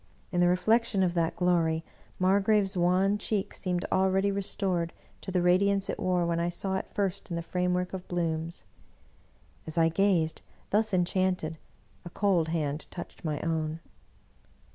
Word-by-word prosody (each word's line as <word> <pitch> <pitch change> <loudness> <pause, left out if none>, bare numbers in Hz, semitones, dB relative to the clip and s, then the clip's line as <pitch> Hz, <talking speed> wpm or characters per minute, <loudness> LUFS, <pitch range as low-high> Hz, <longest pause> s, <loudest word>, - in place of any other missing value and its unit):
In 175 - +1
the 175 - +5
re 180 - +4
flection 220 0 +2
of 175 - 0
that 165 -2 0
glory. 165 -3 +2 0.3
Margrave's 195 +1 +2
wan 185 +3 +2
cheek 205 -2 -1
seemed 180 -2 -2
al 190 0 +3
ready 195 +1 +2
restored 190 -3 -1 0.3
to - - -7
the 180 -2 +1
radiance 195 +2 +3
it - - -6
wore 180 -1 +1
when 170 0 0
I 170 +1 0
saw 190 +2 -3
it - - -5
first 200 -1 -2
in 170 - -3
the 170 - -3
framework 180 +1 -1
of 185 -1 -6
blooms. 165 -1 -2 1.0
As 160 +1 -6
I 165 0 +5
gazed, 170 -3 +1 0.3
thus 215 +2 +2
enchanted, 180 -3 0 0.4
a 175 - -7
cold 180 -3 +1
hand 155 -2 -2
touched 175 - -9
my 150 -3 -2
own. 160 -1 -1
180 Hz, 165 wpm, -29 LUFS, 170-195 Hz, 1.0 s, the